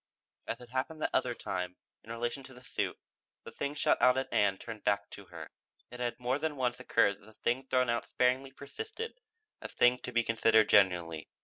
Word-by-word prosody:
As -, -, -2 dB
had 125 Hz, -1 st, -13 dB
happened 130 Hz, +5 st, -3 dB
that -, -, 0 dB
other 120 Hz, -1 st, +1 dB
time, 90 Hz, -3 st, -4 dB, 0.3 s
in 115 Hz, -, -10 dB
relation 120 Hz, +3 st, -3 dB
to 130 Hz, -, -13 dB
the 125 Hz, -, -15 dB
suit, -, -, -2 dB, 0.5 s
the -, -, -9 dB
thing 140 Hz, +1 st, -3 dB
shot -, -, +2 dB
out 125 Hz, 0 st, +6 dB
at 135 Hz, -, -2 dB
Ann 100 Hz, -2 st, +3 dB
turned 110 Hz, +1 st, -8 dB
back 100 Hz, -1 st, 0 dB
to -, -, -10 dB
her. -, -, -10 dB, 0.4 s
It 125 Hz, -, -9 dB
had 120 Hz, 0 st, -2 dB
more 125 Hz, +3 st, 0 dB
than 155 Hz, 0 st, -2 dB
once 125 Hz, -2 st, -1 dB
occurred 100 Hz, -5 st, +2 dB
that -, -, -18 dB
the 110 Hz, -, -15 dB
thing 130 Hz, +4 st, -1 dB
thrown 130 Hz, -1 st, +2 dB
out 120 Hz, 0 st, -1 dB
sparingly 130 Hz, +2 st, +1 dB
persisted 445 Hz, -, -7 dB, 0.4 s
as -, -, -8 dB
thing 125 Hz, +1 st, +4 dB
to 125 Hz, -, -7 dB
be 120 Hz, -1 st, +2 dB
considered 110 Hz, -1 st, +4 dB
genuinely. 90 Hz, -5 st, +3 dB
125 Hz, 210 wpm, -32 LUFS, 110-130 Hz, 0.5 s, out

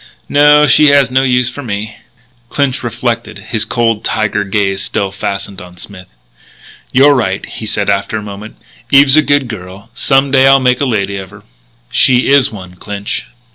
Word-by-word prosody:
"No. 150 Hz, +1 st, +5 dB
She 150 Hz, 0 st, +4 dB
has 140 Hz, -3 st, +4 dB
no 130 Hz, +1 st, +2 dB
use 125 Hz, -1 st, +1 dB
for 145 Hz, -, -8 dB
me." 110 Hz, -3 st, -5 dB, 0.5 s
Clinch 140 Hz, -3 st, -1 dB
reflected, 120 Hz, -2 st, -3 dB
his 110 Hz, 0 st, 0 dB
cold 115 Hz, -2 st, -1 dB
tiger 105 Hz, -1 st, -1 dB
gaze 95 Hz, -1 st, -1 dB
still 95 Hz, 0 st, -2 dB
fastened 100 Hz, 0 st, -5 dB
on 90 Hz, 0 st, -13 dB
Smith. 95 Hz, 0 st, -11 dB, 0.8 s
"You're 140 Hz, +3 st, +5 dB
right," 110 Hz, -8 st, -1 dB
he 110 Hz, -, -8 dB
said 105 Hz, -1 st, -2 dB
after 100 Hz, +2 st, -1 dB
a 105 Hz, -, -6 dB
moment. 105 Hz, +1 st, -9 dB, 0.3 s
"Eve 140 Hz, +2 st, +6 dB
is 135 Hz, 0 st, +3 dB
a 155 Hz, -, +6 dB
good 145 Hz, -3 st, 0 dB
girl. 95 Hz, -2 st, -10 dB
Some 135 Hz, 0 st, +1 dB
day 135 Hz, -1 st, +4 dB
I'll 135 Hz, 0 st, +6 dB
make 125 Hz, 0 st, +1 dB
a -, -, +2 dB
lady 100 Hz, -5 st, -2 dB
of 95 Hz, -1 st, -8 dB
her." 105 Hz, 0 st, -16 dB, 0.5 s
"She 125 Hz, 0 st, +2 dB
is 140 Hz, -2 st, +4 dB
one, 90 Hz, -4 st, -11 dB
Clinch." 100 Hz, +1 st, -6 dB
110 Hz, 180 wpm, -13 LUFS, 100-135 Hz, 0.8 s, Eve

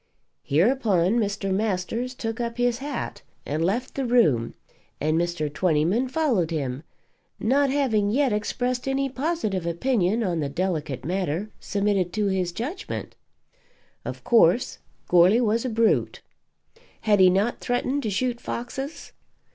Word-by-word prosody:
Hereupon 200 Hz, -, +2 dB
Mr. 200 Hz, -2 st, -1 dB
Masters 220 Hz, +5 st, -1 dB
took 225 Hz, -1 st, -4 dB
up 235 Hz, 0 st, -3 dB
his 245 Hz, -1 st, +1 dB
hat 280 Hz, -2 st, -5 dB, 0.2 s
and 155 Hz, +3 st, -1 dB
left 230 Hz, +9 st, -1 dB
the 275 Hz, -, -2 dB
room, 190 Hz, -, +2 dB, 0.4 s
and 155 Hz, +1 st, +1 dB
Mr. 170 Hz, -2 st, 0 dB
Twentyman 180 Hz, +9 st, +1 dB
followed 255 Hz, -, +1 dB
him, 140 Hz, -5 st, -3 dB, 0.6 s
not 275 Hz, +5 st, +2 dB
having 245 Hz, -7 st, +1 dB
yet 260 Hz, +1 st, +2 dB
expressed 245 Hz, +4 st, -2 dB
any 270 Hz, 0 st, 0 dB
positive 255 Hz, -, -2 dB
opinion 210 Hz, +3 st, +1 dB
on 175 Hz, -5 st, -1 dB
the 145 Hz, -2 st, -1 dB
delicate 155 Hz, -4 st, -2 dB
matter 185 Hz, +3 st, -2 dB
submitted 200 Hz, -3 st, 0 dB
to 210 Hz, -1 st, 0 dB
his 185 Hz, -2 st, 0 dB
judgment. 275 Hz, -, -5 dB, 0.9 s
Of -, -, -6 dB
course, 230 Hz, -1 st, +3 dB, 0.3 s
Goarly 180 Hz, +6 st, +5 dB
was 230 Hz, 0 st, +1 dB
a -, -, 0 dB
brute. 230 Hz, 0 st, +1 dB, 0.8 s
Had 210 Hz, -2 st, +3 dB
he 185 Hz, -1 st, +7 dB
not 200 Hz, +6 st, +1 dB
threatened 255 Hz, +3 st, -1 dB
to 220 Hz, -, -2 dB
shoot 240 Hz, +4 st, -1 dB
foxes? 270 Hz, +5 st, -5 dB
215 Hz, 135 wpm, -25 LUFS, 180-250 Hz, 0.9 s, he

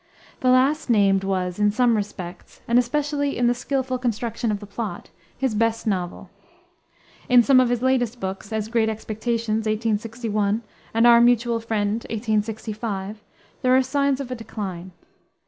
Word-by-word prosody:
The 255 Hz, -, +2 dB
last 265 Hz, +4 st, +3 dB
named 195 Hz, -4 st, +3 dB
was, 185 Hz, -1 st, -2 dB
in 210 Hz, 0 st, +4 dB
some 235 Hz, +2 st, +3 dB
respects, 190 Hz, -4 st, -6 dB
and 235 Hz, +1 st, +4 dB
especially 285 Hz, +3 st, -1 dB
in 245 Hz, -, +1 dB
the 240 Hz, -, +4 dB
skillful 255 Hz, 0 st, -2 dB
construction 235 Hz, -1 st, -2 dB
of 205 Hz, -, -2 dB
the 205 Hz, -, -9 dB
plot, 200 Hz, -2 st, -6 dB, 0.3 s
his 265 Hz, -3 st, 0 dB
best 225 Hz, +1 st, 0 dB
novel. 185 Hz, -5 st, -3 dB, 1.0 s
In 245 Hz, -1 st, +7 dB
some 265 Hz, +1 st, +5 dB
of 255 Hz, -2 st, +3 dB
his 245 Hz, 0 st, -1 dB
latest 245 Hz, -2 st, +1 dB
books, 195 Hz, +1 st, -5 dB
as 215 Hz, -1 st, -2 dB
Great 225 Hz, -1 st, +1 dB
Expectations, 220 Hz, 0 st, -2 dB
1861, 215 Hz, 0 st, -1 dB, 0.3 s
and 230 Hz, +1 st, +4 dB
Our 235 Hz, 0 st, +7 dB
Mutual 235 Hz, -1 st, +3 dB
Friend, 220 Hz, -3 st, -1 dB, 0.2 s
1865, 215 Hz, -2 st, -3 dB, 0.4 s
there 255 Hz, 0 st, +4 dB
are 265 Hz, -, +4 dB
signs 280 Hz, +1 st, 0 dB
of 265 Hz, -2 st, -6 dB
a -, -, -2 dB
decline. 195 Hz, -6 st, -6 dB
225 Hz, 155 wpm, -23 LUFS, 210-245 Hz, 1.0 s, In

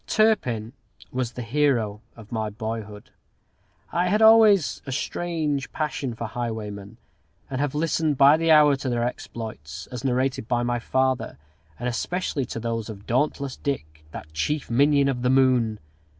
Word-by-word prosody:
Turpin 125 Hz, -, +1 dB, 0.4 s
was 125 Hz, -2 st, -2 dB
the 125 Hz, -, -5 dB
hero 115 Hz, -5 st, +1 dB
of 110 Hz, -3 st, -14 dB
my 110 Hz, -2 st, -2 dB
boyhood. 110 Hz, -1 st, -6 dB, 0.8 s
I 175 Hz, +1 st, +1 dB
had 205 Hz, +4 st, +2 dB
always 220 Hz, -6 st, +6 dB
a -, -, -4 dB
strange 150 Hz, -1 st, -2 dB
passion 145 Hz, -5 st, -3 dB
for 115 Hz, -, -5 dB
highwaymen, 110 Hz, -3 st, -5 dB, 0.5 s
and 130 Hz, +1 st, -1 dB
have 145 Hz, -1 st, -1 dB
listened 155 Hz, -1 st, 0 dB
by 140 Hz, +3 st, +7 dB
the 165 Hz, +1 st, 0 dB
hour 150 Hz, -2 st, +7 dB
to 135 Hz, -1 st, -3 dB
their 120 Hz, -1 st, 0 dB
exploits, 110 Hz, -10 st, -6 dB
as 125 Hz, 0 st, -6 dB
narrated 130 Hz, -3 st, 0 dB
by 120 Hz, 0 st, +1 dB
my 120 Hz, 0 st, 0 dB
father, 130 Hz, +2 st, 0 dB, 0.4 s
and 120 Hz, -, -4 dB
especially 140 Hz, +3 st, -2 dB
to 115 Hz, -, -6 dB
those 115 Hz, -1 st, -3 dB
of 100 Hz, -2 st, -9 dB
"Dauntless 140 Hz, +1 st, -1 dB
Dick," 80 Hz, -, -4 dB
that 75 Hz, 0 st, -10 dB
"chief 145 Hz, -, -2 dB
minion 140 Hz, +3 st, +4 dB
of 130 Hz, -3 st, -1 dB
the 125 Hz, -, +1 dB
moon." 130 Hz, -4 st, +3 dB
125 Hz, 155 wpm, -24 LUFS, 115-145 Hz, 0.8 s, by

